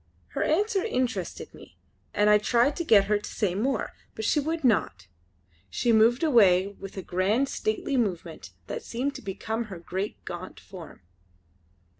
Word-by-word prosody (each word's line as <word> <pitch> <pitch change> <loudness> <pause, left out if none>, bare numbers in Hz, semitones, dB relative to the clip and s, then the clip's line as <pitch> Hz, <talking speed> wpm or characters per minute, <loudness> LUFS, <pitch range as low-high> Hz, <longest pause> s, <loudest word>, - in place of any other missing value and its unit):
Her - - -4
answer 390 +4 +1
interested 255 - -2
me - - -15 0.3
and 210 - +2
I 210 0 +6
tried 240 +6 +2
to 340 - -1
get 210 -10 +5
her 210 +1 +1
to - - -8
say 195 -4 -1
more; 230 +4 -1 0.2
but 220 - -4
she 300 - +3
would 320 +2 -2
not. 95 - +1 0.6
She 235 - +1
moved 230 +5 +4
away 200 - +5
with 195 -1 -10
a 190 - -4
grand 200 +9 +1
stately 220 +5 -1
movement 180 -8 -2 0.2
that - - -5
seemed 265 - -3
to - - -8
become 220 +3 -4
her 195 -4 -8
great 185 +4 -5
gaunt 175 +1 -7
form. 175 - -12
215 Hz, 165 wpm, -27 LUFS, 195-260 Hz, 0.6 s, I